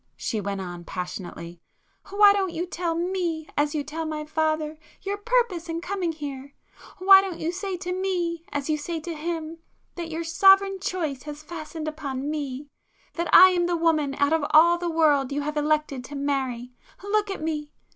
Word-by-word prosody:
she 220 - -2
went 200 0 -3
on 175 -2 -6
passionately—"Why 180 - -1
don't 385 -3 0
you 345 - -1
tell 345 -2 -2
me, 340 -2 -2
as 290 +1 +1
you 295 - -1
tell 310 +3 -5
my 310 -1 -4
father, 310 0 -1 0.2
your 395 +1 -2
purpose 415 -6 0
in 330 0 -2
coming 360 -1 -2
here?—why 295 +6 +2
don't 380 -3 -5
you 325 - -2
say 380 0 -4
to 360 0 -4
me, 355 -3 -2
as 285 -1 -3
you 305 -1 0
say 330 +2 -4
to 335 +2 -6
him, 325 +1 -4 0.3
that 340 -2 -6
your 330 +1 -3
sovereign 390 +3 +5
choice 325 -8 -3
has 295 +1 -8
fastened 315 -1 -7
upon 290 -2 -4
me,—that 295 +3 -6
I 375 - +10
am 350 -1 +1
the 350 -1 0
woman 310 -4 +1
out 285 +2 +2
of 320 -2 +1
all 340 +3 +6
the 350 0 -2
world 295 -5 +3
you 285 +1 -1
have 300 +1 -3
elected 300 -3 0
to 290 - -9
marry! 265 -3 -2 0.3
Look 415 +1 0
at 390 -5 -5
me!" 300 -2 -3
320 Hz, 175 wpm, -25 LUFS, 290-350 Hz, 0.3 s, I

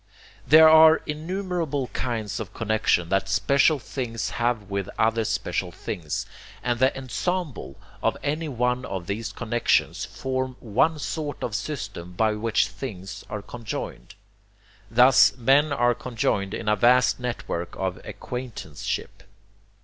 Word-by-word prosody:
There 160 +3 +9
are 160 0 +7
innumerable 165 -2 -2
kinds 110 -5 -3
of 110 - -7
connexion 110 -6 +1
that 95 - +1
special 140 +3 +3
things 125 -3 -4
have 120 -2 0
with 100 -1 -3
other 115 0 +2
special 90 -3 -2
things; 85 -3 -4 0.4
and 120 -1 0
the 130 +1 +4
ENSEMBLE 145 +5 -3 0.2
of - - +1
any 155 +2 -1
one 125 0 0
of 95 -6 -5
these 110 +4 -3
connexions 110 -4 0
forms 130 +2 -3
one 130 +8 +1
sort 150 -1 -4
of 115 - -3
system 105 - -5
by 110 +3 +2
which 110 +1 +1
things 95 -6 -7
are 105 -1 -5
conjoined. 115 0 -7 0.7
Thus 125 +4 +6
men 135 +5 +4
are 120 -3 +3
conjoined 110 -5 -1
in 110 - -6
a 105 - +4
vast 125 +5 +4
network 115 -8 -4
of 95 -1 -2
ACQUAINTANCESHIP. 100 - -6
120 Hz, 130 wpm, -25 LUFS, 105-135 Hz, 0.7 s, There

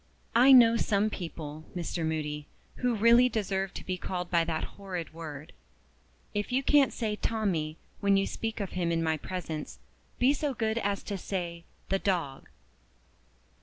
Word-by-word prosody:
"I 250 +4 +7
know 230 -3 +8
some 215 -1 +1
people, 155 -4 -6
Mr. 170 -1 -3
Moody, 150 -2 -2 0.3
who 250 -2 +1
really 235 +3 +6
deserve 195 -4 -1
to - - -7
be 185 -1 -3
called 180 -1 -4
by 170 -1 +4
that 160 -1 -2
horrid 185 -5 -6
word. 155 -2 -8 0.8
If 205 +3 -2
you 260 +2 +1
can't 285 0 +5
say 215 -3 -2
'Tommie,' 180 -9 -1 0.2
when 200 -1 +3
you 195 - +2
speak 225 0 -4
of 200 -3 -3
him 175 -2 -1
in 165 0 +1
my 160 -1 +1
presence, 160 -2 -5 0.4
be 255 +3 +4
so 290 -2 -2
good 220 0 0
as 200 -2 -1
to 200 -2 -4
say 170 -3 -4 0.2
'the 195 - +1
dog. 170 -10 -2
190 Hz, 165 wpm, -29 LUFS, 165-220 Hz, 0.8 s, know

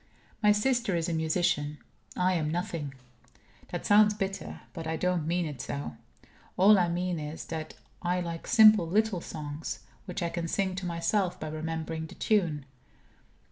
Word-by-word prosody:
My 210 -1 +6
sister 230 -1 +2
is 165 -1 0
a 170 - -1
musician 160 -2 0 0.4
I 185 +1 +3
am 155 -4 0
nothing. 160 -5 -3 0.7
That - - -4
sounds 210 0 +6
bitter; 195 -2 -4
but 165 -3 -6
I 160 - -1
don't 175 -1 0
mean 175 +1 +1
it 145 -5 -5
so. 140 0 -5 0.6
All 200 +2 +7
I 175 -1 +2
mean 175 0 -1
is, 150 +1 -6
that 155 -1 -5 0.3
I 180 0 0
like 170 -2 -5
simple 215 -5 +7
little 205 0 +1
songs, 150 -1 -6 0.2
which 185 -1 -4
I 170 - 0
can 170 0 -3
sing 190 +2 0
to 185 -1 -3
myself 180 +2 0
by 155 - -4
remembering 160 +1 -4
the - - -12
tune. 170 -10 +1
170 Hz, 165 wpm, -29 LUFS, 160-190 Hz, 0.7 s, All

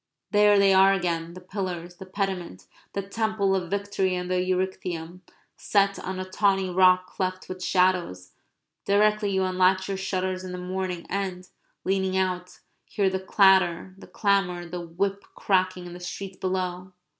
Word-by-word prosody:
There 205 0 +5
they 200 -1 +5
are 190 +1 +6
again, 170 -2 -2
the - - -8
pillars, 180 -2 -5
the 190 - -10
pediment, 185 - -4 0.3
the 200 - -2
Temple 200 -1 0
of 180 -3 -2
Victory 200 -2 -1
and 180 0 -4
the 180 0 +2
Erechtheum, 180 -2 -3 0.4
set 200 -1 +1
on 185 0 -5
a 185 - -3
tawny 195 -1 +1
rock 185 0 +5
cleft 185 0 -4
with 185 0 -7
shadows, 180 - +1 0.5
directly 210 +1 +2
you 190 -1 +1
unlatch 185 0 +2
your 195 -1 -2
shutters 185 -1 -2
in 185 -1 -6
the - - -4
morning 180 -1 -4
and, 185 -2 -3 0.4
leaning 190 0 0
out, 180 -1 -2 0.2
hear 195 -3 0
the 190 - -1
clatter, 190 -2 +3
the 195 - -14
clamour, 195 -4 0
the 175 +1 -6
whip 195 +4 -2
cracking 185 -2 0
in 175 - -8
the 175 - -9
street 185 +2 -7
below. 185 0 -3
185 Hz, 160 wpm, -26 LUFS, 180-195 Hz, 0.5 s, are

